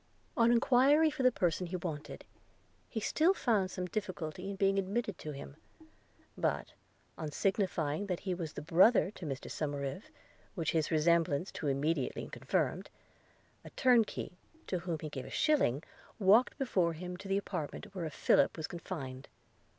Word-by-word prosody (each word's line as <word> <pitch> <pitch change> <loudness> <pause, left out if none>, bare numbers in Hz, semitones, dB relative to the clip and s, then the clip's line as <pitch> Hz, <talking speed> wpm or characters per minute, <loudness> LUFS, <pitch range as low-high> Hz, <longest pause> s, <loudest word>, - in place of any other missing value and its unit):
On 230 0 +4
enquiry 270 +6 +5
for 300 -2 -4
the 255 0 +5
person 180 -4 0
he 180 - -4
wanted, 160 -4 -5 0.6
he 225 - -3
still 320 - +3
found 210 - +1
some 180 0 -4
difficulty 180 -2 -4
in 200 - -4
being 195 0 +2
admitted 205 +1 -2
to 155 - -5
him: 140 0 -9 0.8
but, - - -1 0.5
on 155 -2 -3
signifying 185 -1 0
that 180 -3 -2
he 185 - -2
was 170 -3 -4
brother 185 +6 +4
to 180 -6 -8
Mr 135 -2 -5
Somerive, 145 +3 -3 0.5
which 165 -5 0
his 160 -2 +1
resemblance 165 0 +2
to 150 - -4
immediately 140 0 -1
confirmed, - - -1 0.7
a - - -10
turnkey, 230 -7 +2 0.3
to 180 - -2
whom 170 -2 -3
he 155 - -4
gave 130 -3 -6
a - - -9
shilling, 220 - +2 0.3
walked 215 +4 +4
before 185 - +1
him 180 +2 -6
to 195 - -9
the 195 0 +1
apartment 195 +1 -5
where 170 -4 -3
Philip 150 - +3
was 160 - -3
confined. 140 -7 -6
180 Hz, 155 wpm, -33 LUFS, 155-205 Hz, 0.8 s, enquiry